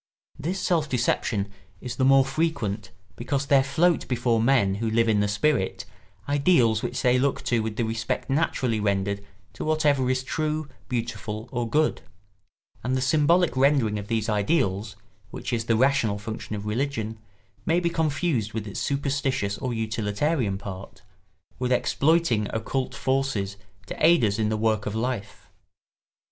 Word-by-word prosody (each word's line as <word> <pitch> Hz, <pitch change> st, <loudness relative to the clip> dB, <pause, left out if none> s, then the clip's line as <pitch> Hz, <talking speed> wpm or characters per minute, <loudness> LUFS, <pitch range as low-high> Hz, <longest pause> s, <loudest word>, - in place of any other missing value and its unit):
This 175 Hz, +6 st, -2 dB
self 165 Hz, -5 st, +1 dB
deception 110 Hz, -5 st, 0 dB, 0.3 s
is 125 Hz, -, -6 dB
the 130 Hz, -, +1 dB
more 135 Hz, 0 st, +6 dB
frequent 135 Hz, -8 st, -2 dB, 0.3 s
because 140 Hz, -1 st, -2 dB
there 140 Hz, -1 st, +5 dB
float 165 Hz, +5 st, +2 dB
before 120 Hz, -2 st, +1 dB
men 115 Hz, -6 st, +3 dB
who 115 Hz, -, 0 dB
live 115 Hz, +1 st, +2 dB
in 110 Hz, -2 st, +3 dB
the 105 Hz, -, +2 dB
spirit 105 Hz, 0 st, 0 dB, 0.4 s
ideals 140 Hz, -7 st, +3 dB
which -, -, -3 dB
they 125 Hz, 0 st, +4 dB
look 140 Hz, +1 st, 0 dB
to 120 Hz, -2 st, +1 dB
with 110 Hz, -1 st, -3 dB
the 120 Hz, -, 0 dB
respect 115 Hz, 0 st, -2 dB
naturally 130 Hz, -5 st, 0 dB
rendered 100 Hz, -1 st, 0 dB, 0.3 s
to -, -, -6 dB
whatever 150 Hz, -4 st, +2 dB
is 130 Hz, 0 st, 0 dB
true, 155 Hz, +2 st, -2 dB, 0.2 s
beautiful, 115 Hz, -2 st, -4 dB
or 120 Hz, -2 st, -2 dB
good; 155 Hz, +3 st, +1 dB, 0.8 s
and 130 Hz, +1 st, 0 dB
the -, -, 0 dB
symbolic 155 Hz, +4 st, +3 dB
rendering 130 Hz, -6 st, +3 dB
of 100 Hz, -, -7 dB
these 110 Hz, -1 st, -1 dB
ideals, 105 Hz, -, 0 dB, 0.3 s
which -, -, -5 dB
is 115 Hz, -1 st, -1 dB
the 115 Hz, -1 st, +2 dB
rational 125 Hz, -5 st, +2 dB
function 110 Hz, +1 st, -6 dB
of 105 Hz, 0 st, -6 dB
religion, 110 Hz, -1 st, -2 dB, 0.4 s
may 165 Hz, +2 st, +2 dB
be 170 Hz, -1 st, 0 dB
confused 155 Hz, -, 0 dB
with 110 Hz, -2 st, -3 dB
its 100 Hz, -, -5 dB
superstitious 135 Hz, -7 st, -1 dB
or 130 Hz, -2 st, -2 dB
utilitarian 110 Hz, +1 st, -1 dB
part—with 100 Hz, +4 st, -9 dB
exploiting 140 Hz, -3 st, +2 dB
occult 125 Hz, +4 st, -2 dB
forces 130 Hz, -8 st, -1 dB, 0.3 s
to -, -, -6 dB
aid 165 Hz, -5 st, +6 dB
us 105 Hz, +1 st, 0 dB
in 105 Hz, -1 st, +1 dB
the 110 Hz, -, 0 dB
work 110 Hz, -1 st, 0 dB
of 105 Hz, -, -3 dB
life. 115 Hz, -2 st, -4 dB
120 Hz, 155 wpm, -25 LUFS, 105-140 Hz, 0.8 s, more